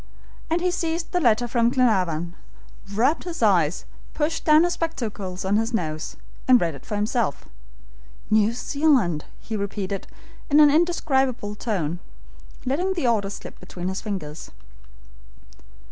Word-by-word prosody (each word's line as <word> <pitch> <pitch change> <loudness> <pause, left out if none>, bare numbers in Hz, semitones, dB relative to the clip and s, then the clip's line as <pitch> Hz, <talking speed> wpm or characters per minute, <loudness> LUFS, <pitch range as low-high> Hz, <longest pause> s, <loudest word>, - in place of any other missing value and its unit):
And 335 +2 +1
he 360 0 +2
seized 335 -1 -2
the 360 - +1
letter 240 -5 +3
from 235 -1 +2
Glenarvan, 185 -10 +1 0.6
rubbed 245 +10 +2
his 335 -8 -4
eyes, 180 -6 +3 0.3
pushed 315 +2 -1
down 310 +1 +6
his 350 0 +1
spectacles 205 - -4
on 200 +2 +2
his 225 +2 0
nose, 155 -6 -3 0.3
and 255 -1 +7
read 165 -2 0
it 140 - -12
for 210 - -3
himself. 210 - -1 0.8
"New 215 0 +4
Zealand!" 250 - +1
he 220 - -5
repeated 200 -1 -3 0.4
in 295 +1 +5
an 295 -1 +8
indescribable 270 -9 +1
tone, 180 -7 -2 0.7
letting 345 +9 0
the 340 - -1
order 215 -5 +2
slip 200 - -9
between 180 0 -5
his 190 - -4
fingers. 165 -8 -5
225 Hz, 140 wpm, -24 LUFS, 190-290 Hz, 0.8 s, an